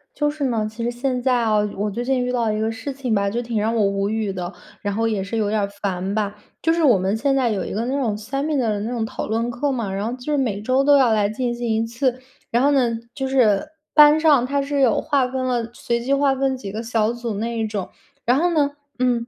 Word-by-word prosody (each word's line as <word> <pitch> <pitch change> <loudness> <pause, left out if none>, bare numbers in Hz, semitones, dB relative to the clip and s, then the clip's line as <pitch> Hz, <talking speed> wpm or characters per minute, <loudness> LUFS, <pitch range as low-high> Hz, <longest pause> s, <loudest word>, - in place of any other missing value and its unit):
就 295 -1 +1
是 295 -1 -4
呢， 225 -4 0
其 225 +2 -6
实 240 - 0
现 250 +1 -2
在 260 -1 +3
啊 215 -2 +2 0.2
我 205 +2 -1
最 235 +4 -4
近 260 -1 +1
遇 250 - -1
到 235 -3 +1
一 215 - -2
个 220 - 0
事 225 +5 -5
情 255 -5 -1
吧， 200 0 +1
就 235 - -1
挺 230 -2 -2
让 220 +2 0
我 220 - +3
无 200 0 0
语 220 -2 -1
的， 180 0 -5 0.3
然 205 -1 -2
后 225 +2 0
也 210 -4 -1
是 200 +4 -4
有 210 -2 +1
点 215 0 +1
儿 200 - 0
烦 190 -1 -2
吧。 205 -1 -1 0.3
就 325 - +2
是 330 0 +1
我 245 -10 +5
们 195 +4 0
现 275 +3 +1
在 260 -3 +2
有 200 -5 -1
一 - - -5
个 225 +3 -1
那 270 +3 -1
种 225 -6 0
seminar 275 +3 -1
的 210 -1 -1
那 225 +3 -3
种 235 -3 -1
讨 - - -5
论 230 +2 -1
课 245 +4 -1
嘛， 230 -7 -2
然 195 +2 -2
后 235 - -2
就 255 +4 -5
是 295 - +2
每 220 -7 -1
周 255 +5 +2
都 285 0 +6
要 255 -4 +4
来 210 -2 +3
进 240 +2 -2
行 240 0 -4
一 220 0 +1
次。 245 +2 -1 0.3
然 235 - +2
后 285 - +5
呢， 260 -4 +3 0.2
就 270 -1 -2
是 250 -3 +3 0.3
班 300 0 +8
上 295 -6 +4
它 280 +2 0
是 280 0 -1
有 245 -5 +3
划 275 -3 +1
分 255 0 -3
了 240 -2 -1
随 235 -1 -2
机 260 +4 -1
划 275 -1 +3
分 270 0 0
几 205 -6 -7
个 220 +3 -4
小 225 -1 +1
组 240 -1 -4
那 230 +3 -3
一 220 - 0
种。 210 -3 -4 0.4
然 245 +2 +4
后 350 +2 +2
呢 295 -3 +2 0.3
嗯， 245 -2 +1
235 Hz, 310 characters per minute, -22 LUFS, 215-265 Hz, 0.4 s, 班